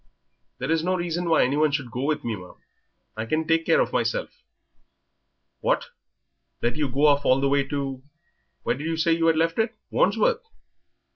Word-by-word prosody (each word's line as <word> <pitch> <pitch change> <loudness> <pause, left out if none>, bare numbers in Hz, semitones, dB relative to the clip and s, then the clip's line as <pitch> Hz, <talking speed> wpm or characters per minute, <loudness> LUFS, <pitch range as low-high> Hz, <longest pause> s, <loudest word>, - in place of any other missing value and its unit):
"There 130 +5 -3
is 165 -1 +2
no 185 +2 +1
reason 175 -1 -2
why 160 - +5
any 130 +3 +1
one 155 0 +4
should 140 -4 -3
go 125 - -4
with 150 0 -1
me, 115 -2 -2
ma'am; 90 -2 -12 0.6
I 110 +1 -4
can 155 +5 0
take 165 0 +2
care - - +4
of - - 0
myself." - - -2 1.2
"What! - - 0 0.7
let 120 - +1
you 150 -3 -1
go 140 +4 +2
off 145 -1 +4
all 130 0 +4
the 140 - +1
way 140 0 +2
to 135 -2 -3 0.6
where - - 0
did 145 +4 -5
you 165 0 -1
say 165 +1 +2
you 165 0 +1
had 165 -1 +3
left 165 +3 +1
it 220 +1 0 0.2
Wandsworth? - - +2
155 Hz, 195 wpm, -25 LUFS, 135-165 Hz, 1.2 s, why